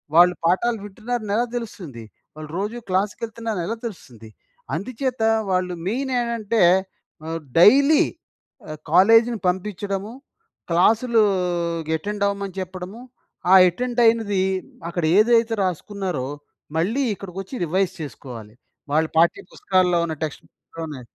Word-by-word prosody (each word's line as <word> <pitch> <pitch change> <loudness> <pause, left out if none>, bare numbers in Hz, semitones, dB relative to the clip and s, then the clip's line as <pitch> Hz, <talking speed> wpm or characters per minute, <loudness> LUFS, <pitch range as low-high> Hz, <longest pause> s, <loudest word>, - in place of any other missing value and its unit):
వాళ్ళు 175 +1 +7
పాఠాలు 225 +7 +2
వింటున్నారని 220 +1 -4
ఎలా 235 +2 +2
తెలుస్తుంది? 180 - -7 0.3
వాళ్ళు 155 -1 -9
రోజు 210 +5 -3
క్లాస్‌కెళ్తున్నారు 220 +2 -2
ఎలా 225 - -2
తెలుస్తుంది? 125 - -9 0.5
అందుచేత 255 +2 -3 0.3
వాళ్ళు 185 -1 0
మెయిన్ 260 +6 -2
ఏంటంటే, 230 -2 -1 0.6
ఆహ్, 165 +1 -3 0.2
డైలీ 280 - +6 0.7
ఆహ్, 155 -1 -7
కాలేజ్‌ని 225 +6 +5
పంపించడము. 195 +2 -3 0.6
క్లాసులూ 220 +7 +3 0.7
అటెండ్ 205 +5 -4
అవ్వమని 200 -2 -4
చెప్పడము, 185 +4 -7 0.5
ఆ - - +8
అటెండ్ 245 +7 -2
అయినది, 220 -4 +2 0.5
అక్కడ 170 0 -3
ఏదైతే 230 +1 +4
రాసుకున్నారో, 185 -5 -3 0.5
మళ్ళీ 220 +12 +1
ఇక్కడికొచ్చి 195 +3 -8
రివైజ్ 185 +2 0
చేసుకోవాలి. 120 -7 -9 0.4
వాళ్ళ 160 +1 +3
పాఠ్య 170 +1 +3
పుస్తకాల్లో 185 -2 +1
ఉన్న 160 -1 -4
టెక్స్ట్ 155 -3 -5
బుక్‌లోనే 160 -5 -9
195 Hz, 110 wpm, -22 LUFS, 175-230 Hz, 0.7 s, ఆ